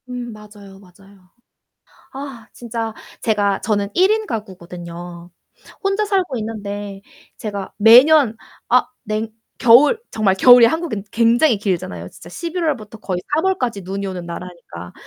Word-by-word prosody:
음 245 -2 -6
맞아요, 205 -2 -14
맞아요. 195 0 -20 0.8
아 270 -4 -8
진짜 230 -2 -5 0.3
제가 205 -3 0
저는 205 -2 -1
1 375 +3 +4
인 435 0 0
가구거든요. 175 - -8 0.5
혼자 395 +2 +1
살고 375 -10 0
있는데 205 -2 -6 0.4
제가 200 -3 -6
매년 245 +2 +6 0.3
아 250 +1 +4 0.2
냉 215 +1 -3 0.3
겨울 265 - +6
정말 210 -4 +1
겨울이 245 +3 +8
한국은 315 - -3
굉장히 235 +2 +3
길잖아요 165 - -3
진짜 170 - -14
11 340 - -4
월부터 220 -8 -3
거의 185 -4 -3
3 315 - +2
월까지 250 - -1
눈이 195 +2 -5
오는 185 -2 -5
나라니까. 170 - -9
215 Hz, 270 characters per minute, -19 LUFS, 195-250 Hz, 0.8 s, 겨울이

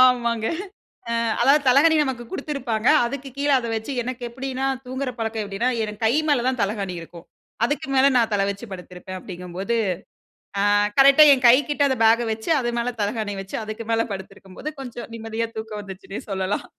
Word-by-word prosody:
ஆமாங்க 235 -3 +3 0.6
அ, - - -1 0.3
அதாவது 285 +2 +5
தலகாணி 295 +5 +6
நமக்கு 255 -3 -3
குடுத்துருப்பாங்க, 255 -6 -2 0.2
அதுக்கு 275 +2 -5
கீழ 285 +1 0
அத 235 - -5
வச்சி, 220 +6 -4
எனக்கு 250 0 -5
எப்டின்னா, 265 +1 -4 0.2
தூங்குற 260 0 -3
பழக்கம் 225 -1 -2
எப்டின்னா, 205 +5 -1
எனக்கு 210 +1 -6
கை 220 - +3
மேல 270 -5 +2
தான் 260 -2 0
தலகாணி 200 -2 -1
இருக்கும், 170 +1 -12 0.4
அதுக்கு 290 +1 -2
மேலே 270 +1 +6
நான் 230 -2 +2
தல 200 -1 +2
வச்சு 200 +4 -5
படுத்திருப்பேன். 180 +1 -9
அப்டிங்கும்போது 185 +5 -4 0.8
அ, - - +2 0.3
கரெக்ட்டா 275 +2 +8
என் 255 -1 -1
கைகிட்ட 285 +4 +4
அந்த 265 - +1
பேக்க 230 +2 +5
வச்சு, 220 +7 -5
அது 240 -1 -1
மேலே 245 +1 -1
தலகாணி 210 0 -2
வச்சு, 195 - -7
அதுக்கு 215 +1 -6
மேலே 225 0 +2
படுத்திருக்கும்போது 195 +8 -8
கொஞ்சம் 240 -2 -8
நிம்மதியா 225 0 -3
தூக்கம் 220 -1 -5
வந்துச்சுன்னே 195 0 -8
சொல்லலாம். 190 +1 -2
230 Hz, 170 wpm, -23 LUFS, 205-260 Hz, 0.8 s, கரெக்ட்டா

